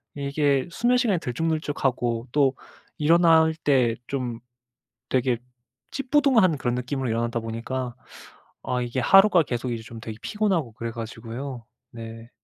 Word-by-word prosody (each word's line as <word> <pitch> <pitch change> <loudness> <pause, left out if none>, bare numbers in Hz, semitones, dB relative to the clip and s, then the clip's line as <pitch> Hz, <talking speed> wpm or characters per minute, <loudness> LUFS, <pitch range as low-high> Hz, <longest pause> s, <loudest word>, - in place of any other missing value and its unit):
이게 140 0 +1
수면시간이 240 -6 +2
들쭉날쭉하고 130 -4 -1
또 140 -2 +3 0.4
일어날 160 0 +5
때 125 -5 +3
좀 125 -4 -3 0.7
되게 125 -2 +1 0.5
찌뿌둥한 260 - +3
그런 125 -2 -1
느낌으로 125 0 -2
일어나다 115 +1 -1
보니까 120 +2 -4 0.7
아 125 -1 -1
이게 120 +1 -3
하루가 195 +4 +6
계속 125 -2 -3
이제 115 -1 -4
좀 115 0 -10
되게 110 -1 -7
피곤하고 190 - 0
그래 115 +1 -5
가지고요. 115 +2 -7 0.2
네. 115 0 -9
130 Hz, 300 characters per minute, -25 LUFS, 115-160 Hz, 0.7 s, 하루가